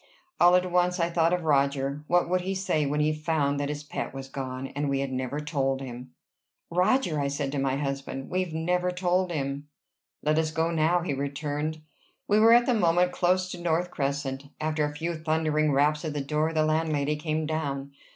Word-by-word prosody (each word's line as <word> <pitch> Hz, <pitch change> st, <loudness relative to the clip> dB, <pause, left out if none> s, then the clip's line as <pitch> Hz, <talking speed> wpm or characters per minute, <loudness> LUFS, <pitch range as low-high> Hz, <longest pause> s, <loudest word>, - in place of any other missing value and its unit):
All 175 Hz, +1 st, +7 dB
at 180 Hz, 0 st, +1 dB
once 180 Hz, 0 st, +2 dB
I 170 Hz, 0 st, +1 dB
thought 165 Hz, 0 st, +2 dB
of 180 Hz, -1 st, 0 dB
Roger. 140 Hz, -1 st, +1 dB
What 175 Hz, 0 st, +3 dB
would 180 Hz, +1 st, +1 dB
he 190 Hz, +2 st, -2 dB
say 160 Hz, -6 st, 0 dB
when 150 Hz, +2 st, 0 dB
he 155 Hz, +1 st, +2 dB
found 150 Hz, -2 st, 0 dB
that 145 Hz, 0 st, -1 dB
his 150 Hz, 0 st, -4 dB
pet 145 Hz, -, -5 dB
was 135 Hz, 0 st, -6 dB
gone, 130 Hz, -1 st, -5 dB
and 145 Hz, 0 st, -2 dB
we 135 Hz, 0 st, 0 dB
had 135 Hz, -1 st, -2 dB
never 130 Hz, +2 st, -3 dB
told 135 Hz, -3 st, -1 dB
him? 125 Hz, -1 st, -8 dB, 0.6 s
"Roger!" 180 Hz, -, +2 dB
I 140 Hz, -, 0 dB
said 140 Hz, 0 st, -2 dB
to 140 Hz, -, -2 dB
my 135 Hz, -1 st, +1 dB
husband. 135 Hz, -1 st, -4 dB
"We've 185 Hz, -1 st, -1 dB
never 180 Hz, +3 st, 0 dB
told 180 Hz, 0 st, 0 dB
him!" 140 Hz, -2 st, -3 dB, 0.6 s
"Let 155 Hz, +1 st, +2 dB
us 160 Hz, -1 st, +1 dB
go 160 Hz, +1 st, 0 dB
now," 165 Hz, +2 st, +2 dB
he 170 Hz, -4 st, -2 dB
returned. 145 Hz, +3 st, -3 dB, 0.4 s
We 205 Hz, +1 st, +4 dB
were 225 Hz, +1 st, +7 dB
at 240 Hz, +1 st, +6 dB
the 250 Hz, -, +2 dB
moment 180 Hz, -4 st, +3 dB
close 185 Hz, +1 st, +1 dB
to 175 Hz, -, -7 dB
North 175 Hz, +1 st, 0 dB
Crescent. 140 Hz, -1 st, -2 dB
After 155 Hz, 0 st, 0 dB
a 150 Hz, 0 st, -5 dB
few 165 Hz, +3 st, -2 dB
thundering 155 Hz, -1 st, +1 dB
raps 150 Hz, +2 st, +2 dB
at 155 Hz, -3 st, -3 dB
the 145 Hz, -, -2 dB
door, 150 Hz, +3 st, 0 dB
the 155 Hz, -1 st, +2 dB
landlady 155 Hz, -2 st, +1 dB
came 155 Hz, +1 st, -2 dB
down. 140 Hz, -3 st, -3 dB
155 Hz, 205 wpm, -27 LUFS, 140-175 Hz, 0.6 s, All